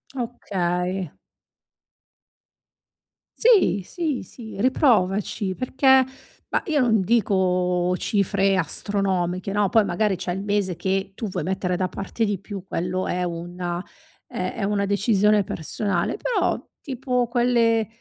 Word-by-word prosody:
Okay. 185 Hz, -, -2 dB, 2.3 s
Sì, 440 Hz, -, +4 dB
sì, 320 Hz, -7 st, -2 dB
sì 225 Hz, -3 st, -10 dB
riprovaci 205 Hz, -5 st, +2 dB
perché 265 Hz, +2 st, +4 dB, 0.5 s
bah, -, -, +1 dB
io 310 Hz, -4 st, +1 dB
non 225 Hz, -4 st, +3 dB
dico 180 Hz, -4 st, +1 dB
cifre 195 Hz, -1 st, +1 dB
astronomiche, 185 Hz, +1 st, 0 dB
no, 205 Hz, -1 st, +2 dB
poi 220 Hz, -1 st, +4 dB
magari 195 Hz, +3 st, +1 dB
c'è 175 Hz, 0 st, -3 dB
il 190 Hz, -, -4 dB
mese 200 Hz, -3 st, 0 dB
che 195 Hz, +2 st, -1 dB
tu 220 Hz, -, -4 dB
vuoi 180 Hz, -3 st, -3 dB
mettere 180 Hz, +1 st, -1 dB
da 185 Hz, 0 st, 0 dB
parte 200 Hz, +4 st, -3 dB
di 205 Hz, -2 st, -1 dB
più, 200 Hz, -1 st, -7 dB
quello 180 Hz, +1 st, -2 dB
è 180 Hz, 0 st, -1 dB
una 175 Hz, +1 st, -4 dB, 0.4 s
è 185 Hz, 0 st, -3 dB
è -, -, -2 dB
una 200 Hz, 0 st, +1 dB
decisione 205 Hz, 0 st, +3 dB
personale; 180 Hz, -, -1 dB
però -, -, 0 dB, 0.2 s
tipo 250 Hz, -2 st, -1 dB
quelle 235 Hz, -2 st, +2 dB
200 Hz, 125 wpm, -23 LUFS, 180-230 Hz, 2.3 s, Sì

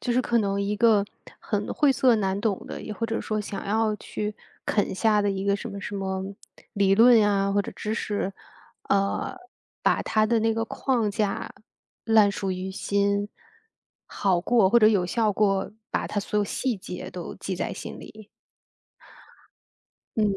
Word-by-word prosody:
就 245 Hz, -, -1 dB
是 250 Hz, -, +3 dB
可 235 Hz, -1 st, +1 dB
能 200 Hz, -2 st, 0 dB
一 205 Hz, +1 st, -1 dB
个 215 Hz, -3 st, +4 dB, 0.3 s
很 205 Hz, -2 st, -2 dB
晦 290 Hz, -3 st, +3 dB
涩 255 Hz, -2 st, +4 dB
难 195 Hz, -2 st, 0 dB
懂 205 Hz, -3 st, -1 dB
的， -, -, -6 dB
也 215 Hz, -, -6 dB
或 230 Hz, -, -3 dB
者 225 Hz, -, -2 dB
说 215 Hz, -1 st, -2 dB
想 205 Hz, -1 st, -6 dB
要 215 Hz, +1 st, +1 dB
去， 210 Hz, 0 st, -5 dB, 0.3 s
啃 205 Hz, -, 0 dB
下 210 Hz, +1 st, +3 dB
的 205 Hz, -1 st, +1 dB
一 195 Hz, 0 st, -3 dB
个 200 Hz, 0 st, +2 dB
什 235 Hz, -, -6 dB
么 200 Hz, -1 st, -7 dB
什 205 Hz, -, -6 dB
么 190 Hz, -1 st, -2 dB, 0.5 s
理 195 Hz, -1 st, +3 dB
论 230 Hz, +2 st, +7 dB
呀， 200 Hz, -2 st, +2 dB
或 205 Hz, -, +3 dB
者 -, -, -5 dB
知 215 Hz, +1 st, -3 dB
识。 205 Hz, -3 st, -2 dB, 0.6 s
呃， 195 Hz, -, +1 dB, 0.5 s
把 -, -, +2 dB
它 215 Hz, 0 st, +2 dB
的 230 Hz, +1 st, +2 dB
那 225 Hz, +1 st, +2 dB
个 225 Hz, 0 st, -1 dB
框 235 Hz, -4 st, 0 dB
架 200 Hz, 0 st, -2 dB, 0.5 s
烂 220 Hz, -3 st, +5 dB
熟 195 Hz, -1 st, -3 dB
于 185 Hz, +1 st, -4 dB
心， 200 Hz, +1 st, 0 dB, 0.7 s
好 190 Hz, -3 st, 0 dB
过 225 Hz, -5 st, +4 dB
或 235 Hz, -, +5 dB
者 215 Hz, -, +6 dB
有 195 Hz, -5 st, +3 dB
效 215 Hz, +3 st, +1 dB
过 195 Hz, -1 st, +1 dB, 0.2 s
把 -, -, -1 dB
它 205 Hz, -, -2 dB
所 210 Hz, -, -4 dB
有 205 Hz, -, +2 dB
细 250 Hz, +3 st, -1 dB
节 185 Hz, -2 st, -7 dB
都 175 Hz, -2 st, -7 dB
记 190 Hz, -2 st, -4 dB
在 -, -, -3 dB
心 -, -, -7 dB
里。 215 Hz, -1 st, -12 dB, 1.9 s
嗯， 220 Hz, -, +2 dB
205 Hz, 195 characters per minute, -25 LUFS, 195-220 Hz, 1.9 s, 论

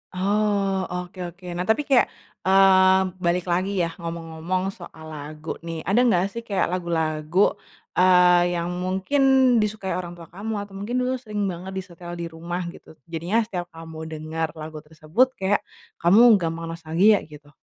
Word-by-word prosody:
Oh, 195 Hz, -1 st, +1 dB
oke 180 Hz, +1 st, -6 dB
oke. 180 Hz, +2 st, -13 dB
Nah, 175 Hz, +1 st, -3 dB
tapi 225 Hz, +7 st, +2 dB
kayak, 270 Hz, -3 st, +4 dB, 0.4 s
mmm, 190 Hz, -1 st, +5 dB
balik 175 Hz, 0 st, +1 dB
lagi 185 Hz, +3 st, 0 dB
ya 165 Hz, -, -2 dB
ngomong-ngomong 165 Hz, +2 st, -3 dB
soal 165 Hz, -4 st, -12 dB
lagu 155 Hz, +1 st, -7 dB
nih, 165 Hz, -1 st, -5 dB
ada 200 Hz, +7 st, +2 dB
enggak 200 Hz, -6 st, +3 dB
sih 235 Hz, 0 st, -6 dB
kayak 195 Hz, -3 st, 0 dB
lagu-lagu, 165 Hz, 0 st, +1 dB, 0.5 s
eee, 180 Hz, -1 st, +5 dB
yang 170 Hz, +1 st, -2 dB
mungkin 190 Hz, +10 st, 0 dB, 0.4 s
disukai 210 Hz, -2 st, -2 dB
orang 175 Hz, -1 st, -7 dB
tua 165 Hz, -1 st, -13 dB
kamu 210 Hz, +5 st, -5 dB
atau 200 Hz, -1 st, -14 dB
mungkin 230 Hz, +5 st, -4 dB
dulu 255 Hz, -, 0 dB
sering 210 Hz, -4 st, -4 dB
banget 180 Hz, +2 st, -7 dB
disetel 175 Hz, -2 st, -7 dB
di 170 Hz, -, -5 dB
rumah 175 Hz, +2 st, -4 dB
gitu? 160 Hz, -, -15 dB, 0.2 s
Jadinya 175 Hz, +8 st, 0 dB
setiap 180 Hz, -5 st, -5 dB
kamu 160 Hz, -1 st, -9 dB
denger 160 Hz, +1 st, -3 dB
lagu 155 Hz, 0 st, -7 dB
tersebut 155 Hz, +10 st, +1 dB
kayak 195 Hz, +1 st, +1 dB, 0.4 s
kamu 215 Hz, +5 st, +6 dB
gampang 165 Hz, -1 st, -3 dB
nostalgia 165 Hz, +6 st, +3 dB
gitu. 150 Hz, -1 st, -14 dB
180 Hz, 155 wpm, -24 LUFS, 165-195 Hz, 0.5 s, kamu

